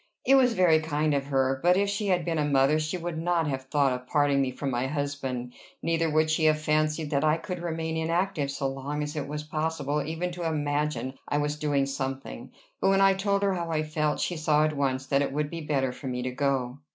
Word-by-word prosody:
It 270 - +5
was 255 -3 +5
very 180 -6 +4
kind 155 -1 0
of 140 -1 -1
her; 135 -1 +1
but 180 +2 +4
if 200 +1 +2
she 200 +1 -2
had 180 -3 +1
been 165 -2 -1
a - - +2
mother 140 +1 +3
she 155 +3 -2
would 170 -2 -4
not 170 0 +1
have 135 -2 -3
thought 140 -1 +2
of 125 0 -6
parting 145 -2 +2
me 135 - +1
from 135 +2 -4
my 125 +1 -1
husband; 135 -4 -3 0.3
neither 165 0 +1
would 155 0 +2
she 155 0 +2
have 155 0 +4
fancied 155 0 0
that 140 0 +1
I 155 +1 +3
could 180 +1 -6
remain 160 -1 -3
inactive 165 -1 0
so 140 0 -2
long 135 +2 -3
as 150 +1 -5
it 145 -2 -3
was 150 +1 -4
possible 150 -1 -2
even 165 +4 -3
to 175 0 -6
imagine 145 -3 -2
I 145 - 0
was 145 0 0
doing 145 -2 +1
something; 135 - -5 0.3
but 195 - +2
when 195 0 +4
I 195 0 +6
told 200 +1 0
her 200 -1 +2
how 170 -2 -3
I 155 -1 0
felt, 155 -1 -1
she 175 - -1
saw 155 -1 +3
at 155 -1 -1
once 135 -2 0
that 140 +1 +2
it 140 - -1
would 150 +1 -2
be 165 -1 -5
better 135 -4 0
for 130 +2 -8
me 125 -1 -3
to 130 - -2
go. 130 -1 -1
150 Hz, 240 wpm, -27 LUFS, 140-165 Hz, 0.3 s, I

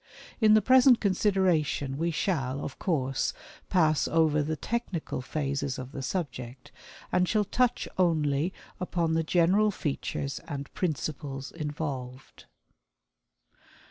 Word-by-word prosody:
In 215 -2 +6
the 215 - +4
present 255 0 +6
consideration 185 -8 +1
we 165 +4 0
shall, 140 -6 -1
of 140 - -7
course, 135 -7 0 0.4
pass 155 -4 +3
over 160 -2 +3
the 155 +2 -1
technical 195 - -3
phases 140 -1 -2
of 130 0 -7
the 140 - -6
subject, 130 -6 -5 0.4
and 180 0 +2
shall 215 -2 +2
touch 245 +4 +1
only 155 -2 +2 0.3
upon 170 -3 0
the 165 - +2
general 180 +6 +3
features 140 -6 -3
and 140 -1 -6
principles 145 -5 -3
involved. 145 -5 -6
155 Hz, 115 wpm, -28 LUFS, 140-185 Hz, 0.4 s, In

